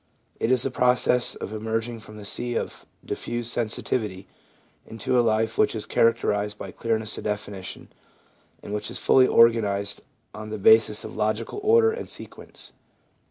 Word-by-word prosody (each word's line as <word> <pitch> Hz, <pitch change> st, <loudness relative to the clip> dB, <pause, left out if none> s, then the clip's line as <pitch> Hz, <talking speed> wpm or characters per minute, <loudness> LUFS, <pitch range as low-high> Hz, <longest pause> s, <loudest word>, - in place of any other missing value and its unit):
It 115 Hz, -, +1 dB
is 130 Hz, -1 st, +2 dB
a 135 Hz, -, -1 dB
process 125 Hz, 0 st, +2 dB
of 105 Hz, -, -7 dB
emerging 110 Hz, +2 st, -3 dB
from 105 Hz, -1 st, -12 dB
the 105 Hz, -, -9 dB
sea 120 Hz, +3 st, -3 dB
of -, -, -5 dB, 0.2 s
diffused 120 Hz, 0 st, -3 dB
sensitivity 105 Hz, -4 st, -2 dB, 0.6 s
into 115 Hz, +3 st, -2 dB
a 125 Hz, -, +5 dB
life 110 Hz, 0 st, 0 dB
which 110 Hz, -, +3 dB
is 110 Hz, -, -3 dB
characterised 105 Hz, -3 st, +1 dB
by -, -, -7 dB
clearness 110 Hz, -2 st, -2 dB
of -, -, -9 dB
definition, 100 Hz, -2 st, -5 dB, 0.8 s
and 100 Hz, -, -6 dB
which 105 Hz, -, -3 dB
is -, -, -5 dB
fully 130 Hz, -1 st, +5 dB
organised 105 Hz, -3 st, +3 dB, 0.3 s
on 110 Hz, 0 st, -8 dB
the 110 Hz, -, -4 dB
basis 105 Hz, +1 st, +5 dB
of -, -, -8 dB
logical 110 Hz, -, -2 dB
order 450 Hz, +2 st, +5 dB
and 455 Hz, +1 st, -6 dB
sequence. -, -, -9 dB
110 Hz, 160 wpm, -25 LUFS, 105-120 Hz, 0.8 s, a